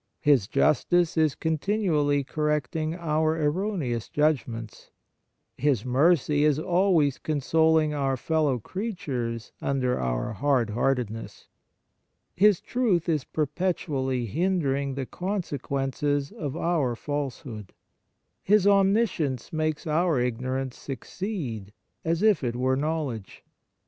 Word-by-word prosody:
His 140 -9 +4
justice 165 +6 +2
is 155 -3 +2
continually 160 -4 +1
correcting 150 +2 -1
our 160 -1 0
erroneous 150 - -1
judgments. 120 -7 -1 0.7
His 130 -5 +1
mercy 145 +2 +3
is 150 -2 +3
always 170 -4 +2
consoling 155 +1 +2
our 135 -2 0
fellow 150 -2 +1
creatures 125 - -4
under 130 -2 0
our - - -2
hard 120 0 +1
heartedness. 120 -1 -2 0.8
His 205 -1 +4
truth 215 -10 0
is 155 -5 0
perpetually 145 -5 -1
hindering 140 - 0
the 135 -1 -3
consequences 145 -6 -2
of 145 0 -5
our 155 -9 0
false 145 0 -3
hood. 110 -7 -9 0.7
His 205 0 +3
omniscience 195 - +2
makes 155 +1 -1
our 160 -2 +2
ignor 125 +2 -1
ance 130 -2 -6
succeed 135 - -5 0.3
as 165 +4 0
if 210 -9 +4
it 120 -1 -1
were 130 +1 +1
knowledge. 140 - -3
150 Hz, 110 wpm, -26 LUFS, 130-165 Hz, 0.8 s, His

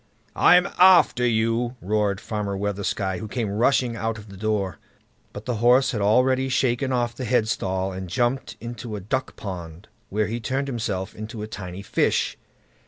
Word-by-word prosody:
"I'M 180 +2 +6
AFTER 180 -9 +6
YOU", 115 +2 +1
roared 105 -1 0
Farmer 105 -3 -3
Weathersky, 100 -1 -2
who 110 - -6
came 110 -2 -2
rushing 120 +2 +2
out 110 0 -2
of 105 0 -12
the 100 - -11
door. 100 -2 -2 0.5
But 105 - -9
the 125 -3 -2
horse 125 +4 +4
had 105 - -2
already 130 +5 +3
shaken 130 +1 +1
off 120 -2 0
the 130 - -6
headstall, 95 -5 0
and 95 -1 -6
jumped 120 +7 -1
into 115 -1 -6
a - - -4
duck 130 +8 -3
pond, 90 -2 -8 0.2
where 105 +2 0
he 115 +3 -3
turned 130 +5 -2
himself 105 -6 -3
into 110 0 -7
a - - -5
tiny 95 -2 -7
fish. - - +1
110 Hz, 170 wpm, -24 LUFS, 100-125 Hz, 0.5 s, I'M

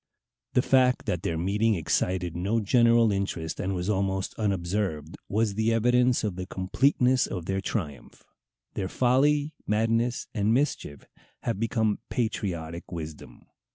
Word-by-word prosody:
The 125 - +3
fact 130 -1 +3
that 85 - -1
their 85 -4 -2
meeting 105 +6 +1
excited 90 +1 -1
no 100 +6 0
general 115 +1 +4
interest, 95 -5 -3
and 95 +1 -1
was 90 0 -3
almost 95 -2 -1
unobserved, 95 -6 -2
was 105 0 +1
the 110 +2 +1
evidence 125 +2 +3
of 100 -4 -2
the 90 0 -5
completeness 125 +7 +2
of 90 -4 -5
their 95 +1 -1
triumph. 80 - -5 0.5
Their 95 -2 -3
"folly, 145 +6 +2
madness, 115 +3 +1
and 110 +1 +2
mischief" 130 - -2 0.4
have 115 -4 -2
become 110 -2 0
patriotic 85 -9 -3
wisdom. 80 -3 -8
105 Hz, 135 wpm, -27 LUFS, 90-115 Hz, 0.5 s, general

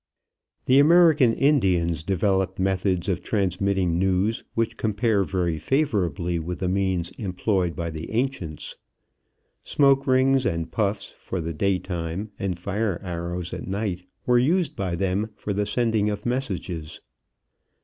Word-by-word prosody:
The 130 +2 +5
American 155 -4 +6
Indians 95 - +2
developed 95 +2 0
methods 95 -1 0
of 90 -3 0
transmitting 95 -3 0
news 95 +4 +1
which 115 -1 0
compare 110 -1 +1
very 90 -4 -1
favorably 90 - 0
with 85 +2 -4
the 95 - -2
means 95 -2 0
employed 95 -3 -1
by 85 -1 -3
the 80 +1 -6
ancients. 115 - -3 0.8
Smoke 140 -1 +3
rings 130 0 +4
and 85 -6 -2
puffs 100 +2 0
for 95 - -5
the 85 0 -3
daytime, 90 +1 -2
and 95 -3 -2
fire 100 +1 -2
arrows 85 0 -4
at - - -6
night, 95 -2 -3 0.2
were 125 -1 +4
used 165 +7 +1
by 95 -3 -2
them 95 +4 -1
for 105 - -4
the 100 +1 -1
sending 110 -2 +1
of 105 0 -4
messages. 95 - -3
95 Hz, 135 wpm, -24 LUFS, 90-115 Hz, 0.8 s, American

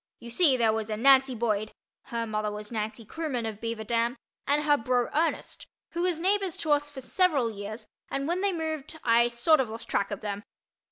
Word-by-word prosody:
You 235 - -10
see 280 -2 +4
there 225 -2 +3
was 220 0 -3
a 215 - -2
Nancy 265 +1 +5
Boyd 215 -2 -1 0.3
(her 230 -1 -3
mother 215 -1 -2
was 210 +1 -7
Nancy 220 0 -4
Kroomen 260 -4 -3
of 215 -1 -6
Beaver 230 -1 -3
Dam) 235 +2 0 0.3
and 290 +1 +2
her 295 -1 +4
bro. 245 -1 0
Ernest, 325 +2 -1 0.2
who 340 - -3
was 360 -2 +1
neighbors 385 0 +1
to 310 - -2
us 290 0 +2
for 280 -2 -8
several 280 -6 +2
years, 215 +2 -7 0.2
and 275 +1 -2
when 350 +3 0
they 400 0 +2
moved 320 -2 -4
I 235 0 +5
sort 240 +7 +3
of 255 -4 0
lost 225 +1 -7
track 200 - 0
of 205 - -5
them. 205 -1 -4
240 Hz, 210 wpm, -28 LUFS, 220-300 Hz, 0.3 s, Nancy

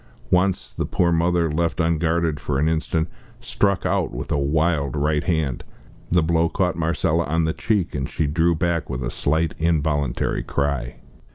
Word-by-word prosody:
Once, 95 +1 +1
the - - -3
poor 85 -1 +1
mother, 85 -1 +2
left 85 +2 -1
unguarded 85 -1 +1
for 70 - -2
an 75 +3 +2
instant, 80 0 0 0.3
struck 100 -2 0
out - - 0
with 65 +6 -6
a - - +2
wild 75 0 +1
right 75 +1 +1
hand. 80 -7 0 0.5
The 85 -1 +3
blow 80 0 +2
caught 90 -1 0
Marcella 85 0 0
on 80 +2 +1
the 80 - 0
cheek, 105 -6 -1
and 65 -2 -3
she 80 - -1
drew 85 +3 +2
back 85 +1 -1
with 65 -2 -3
a - - -3
slight 80 +2 0
involuntary 75 -5 0
cry. 70 -4 -2
80 Hz, 170 wpm, -22 LUFS, 75-85 Hz, 0.5 s, The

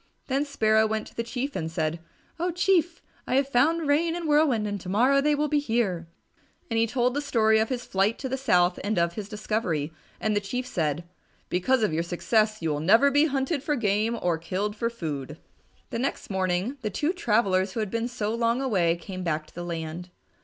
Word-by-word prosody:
Then 275 +2 0
Sparrow 220 -5 +3
went 220 0 -2
to - - -23
the - - -1
Chief 250 +4 -4
and 160 - -2
said, 160 0 -1 0.4
"Oh, 350 +2 0
Chief, 350 -1 +1 0.2
I 255 - 0
have 270 0 +3
found 300 +5 +2
Rain 325 +4 +2
and 345 -2 -4
Whirlwind 295 -8 +3
and 205 -2 -3
to 180 - -7
morrow 255 +8 +4
they 300 +1 +2
will 300 +1 0
be 295 0 +2
here," 220 - -1 0.6
and 225 - +2
he 230 - +3
told 245 +2 +1
the 290 - -1
story 220 -6 +3
of 220 - +1
his 250 -2 -3
flight 195 +4 +1
to 265 - -4
the 260 - -1
south 180 -9 +2
and 205 0 -1
of 170 0 +2
his 210 0 -6
discovery. 210 -8 -2 0.3
And 215 -1 0
the 205 - +1
Chief 250 +5 -3
said, 160 - -1 0.5
"Because 225 +7 +2
of 205 - +1
your 160 - +1
success, 215 +4 0
you 160 - +1
will 145 - -1
never 225 - +5
be 290 +2 +4
hunted 280 0 -1
for 295 +2 0
game 220 0 +1
or 170 -2 0
killed 195 +5 -2
for 230 +2 -1
food." 150 - -5 0.5
The - - -2
next 265 -4 -3
morning 190 +7 -1
the 215 - -2
two 295 - -1
travellers 200 - +1
who - - -3
had 210 -3 -2
been 230 +1 -1
so 225 -3 -3
long 230 +1 +1
away 190 -11 +2
came 185 +2 -7
back 155 -3 -1
to - - -21
the 175 - -6
land. 170 +1 -5
220 Hz, 215 wpm, -26 LUFS, 180-265 Hz, 0.6 s, never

